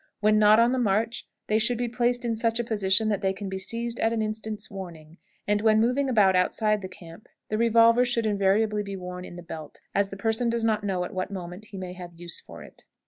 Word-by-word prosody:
When 215 Hz, 0 st, +3 dB
not 215 Hz, +1 st, +6 dB
on 235 Hz, +1 st, +4 dB
the 260 Hz, -, 0 dB
march, 225 Hz, +1 st, 0 dB, 0.2 s
they 215 Hz, +1 st, +1 dB
should 235 Hz, +2 st, +1 dB
be 245 Hz, 0 st, -1 dB
placed 245 Hz, +1 st, 0 dB
in 230 Hz, -1 st, 0 dB
such 230 Hz, +1 st, +1 dB
a -, -, 0 dB
position 215 Hz, -1 st, +2 dB
that 205 Hz, -2 st, -1 dB
they 190 Hz, -1 st, 0 dB
can 195 Hz, 0 st, -6 dB
be 190 Hz, 0 st, -4 dB
seized 230 Hz, +4 st, +1 dB
at 225 Hz, -, +2 dB
an 225 Hz, -1 st, -1 dB
instant's 215 Hz, -1 st, -3 dB
warning; 170 Hz, -4 st, -10 dB, 0.3 s
and 205 Hz, 0 st, +1 dB
when 220 Hz, 0 st, +4 dB
moving 250 Hz, +4 st, +1 dB
about 205 Hz, -6 st, +4 dB
outside 210 Hz, +3 st, +1 dB
the 190 Hz, -, -5 dB
camp, 170 Hz, +1 st, -14 dB, 0.2 s
the 215 Hz, -, -1 dB
revolver 230 Hz, +1 st, +5 dB
should 240 Hz, -2 st, 0 dB
invariably 210 Hz, +1 st, +1 dB
be 200 Hz, -1 st, -6 dB
worn 180 Hz, -1 st, -7 dB
in 175 Hz, -, -10 dB
the 175 Hz, -, -9 dB
belt, 160 Hz, -3 st, -9 dB
as 200 Hz, 0 st, +1 dB
the 195 Hz, -, -8 dB
person 225 Hz, +3 st, 0 dB
does 230 Hz, 0 st, 0 dB
not 215 Hz, -2 st, +1 dB
know 190 Hz, -3 st, -1 dB
at -, -, -7 dB
what 185 Hz, +1 st, -3 dB
moment 185 Hz, +1 st, -8 dB
he 200 Hz, -, -10 dB
may 185 Hz, -1 st, -6 dB
have 175 Hz, -2 st, -10 dB
use 170 Hz, 0 st, -3 dB
for -, -, -12 dB
it. -, -, -16 dB
210 Hz, 245 wpm, -26 LUFS, 190-230 Hz, 0.3 s, not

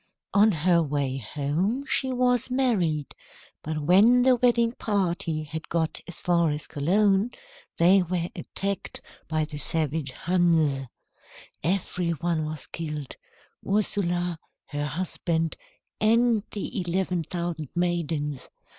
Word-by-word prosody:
On 210 Hz, +2 st, +6 dB
her 170 Hz, 0 st, +3 dB
way 140 Hz, -3 st, -1 dB
home 155 Hz, -, -1 dB
she 265 Hz, -1 st, +1 dB
was 250 Hz, -1 st, +2 dB
married, 195 Hz, -, +1 dB, 0.5 s
but 155 Hz, 0 st, -4 dB
when 215 Hz, +10 st, +6 dB
the 255 Hz, 0 st, +5 dB
wedding 235 Hz, -1 st, +3 dB
party 175 Hz, -8 st, -1 dB
had 160 Hz, +1 st, -7 dB
got 165 Hz, -1 st, -1 dB
as 175 Hz, -, -6 dB
far 170 Hz, -2 st, +2 dB
as 150 Hz, 0 st, -3 dB
Cologne, 195 Hz, +8 st, +2 dB, 0.5 s
they 185 Hz, +3 st, +6 dB
were 175 Hz, -1 st, -1 dB
attacked 195 Hz, -1 st, -4 dB, 0.3 s
by 155 Hz, -1 st, 0 dB
the 150 Hz, -1 st, -6 dB
savage 155 Hz, -2 st, -1 dB
Huns. 160 Hz, -5 st, +1 dB, 0.8 s
Every 180 Hz, 0 st, -1 dB
one 165 Hz, 0 st, -1 dB
was 155 Hz, -1 st, -5 dB
killed, 150 Hz, -4 st, -6 dB, 0.5 s
Ursula, 175 Hz, -4 st, 0 dB, 0.3 s
her 145 Hz, 0 st, -3 dB
husband, 165 Hz, 0 st, -1 dB, 0.4 s
and 230 Hz, 0 st, +4 dB
the 205 Hz, +1 st, -4 dB
eleven 180 Hz, 0 st, -1 dB
thousand 170 Hz, -3 st, -4 dB
maidens. 160 Hz, -5 st, -1 dB
175 Hz, 120 wpm, -26 LUFS, 155-200 Hz, 0.8 s, On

